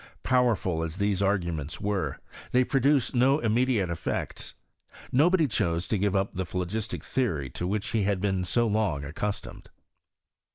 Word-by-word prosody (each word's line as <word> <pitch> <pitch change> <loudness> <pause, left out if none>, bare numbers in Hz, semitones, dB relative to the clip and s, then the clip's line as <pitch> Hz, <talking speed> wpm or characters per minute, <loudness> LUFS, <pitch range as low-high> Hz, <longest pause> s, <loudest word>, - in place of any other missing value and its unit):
Powerful 115 -10 +2
as 80 0 -3
these 100 -1 0
arguments 85 -5 -1
were, 100 -2 -1 0.4
they 125 +1 +5
produced 135 0 +2
no 130 +3 +4
immediate 115 - +1
effects. 85 - -4 0.6
JNobody 160 +4 +4
chose 85 -7 0
to 110 - +1
give 100 0 +1
up 95 +1 0
the 95 - -2
phlogistic 95 +5 -3
theory 80 - -1
to 90 - -3
which 105 +2 -1
he 115 - +1
had 100 -1 +1
been 95 -1 0
so 120 +7 +1
long 105 -10 0
accustomed. 100 +8 -5
100 Hz, 150 wpm, -27 LUFS, 90-120 Hz, 0.6 s, they